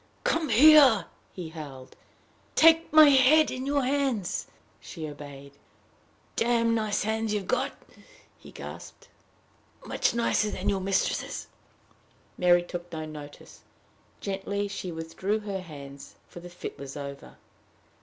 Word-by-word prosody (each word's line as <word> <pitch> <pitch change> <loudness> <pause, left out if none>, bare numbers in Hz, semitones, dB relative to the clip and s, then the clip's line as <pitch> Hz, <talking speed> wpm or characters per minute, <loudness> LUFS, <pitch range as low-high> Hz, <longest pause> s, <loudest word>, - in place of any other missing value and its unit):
"Come 320 -3 0
here," 260 - +7 0.3
he 175 -4 -7
howled; 140 -5 -10 0.6
"take 325 +1 +5
my 310 -1 +8
head 280 +3 +5
in 255 +1 -5
your 285 -1 +1
hands." 260 -9 -1 0.3
She 160 -3 -8
obeyed. 140 -1 -10 0.8
"Damned 230 -1 +2
nice 215 -2 0
hands 220 0 -1
you've 200 -2 -3
got!" - - -1 0.7
he - - -14
gasped; - - -10 0.8
"much - - 0
nicer 230 -2 +1
than - - -2
your 195 -1 0
mistress's." 195 0 -1 0.9
Mary 175 -1 +4
took 175 0 -8
no 160 -1 -5
notice. 150 -2 -11 0.6
Gently 200 +1 -3
she 195 -2 -6
withdrew 170 +6 -3
her 200 -2 -4
hands, 140 -5 -11
for - - -11
the 175 +1 -10
fit 175 - -8
was 140 0 -8
over. 140 -1 -9
195 Hz, 125 wpm, -27 LUFS, 160-235 Hz, 0.9 s, my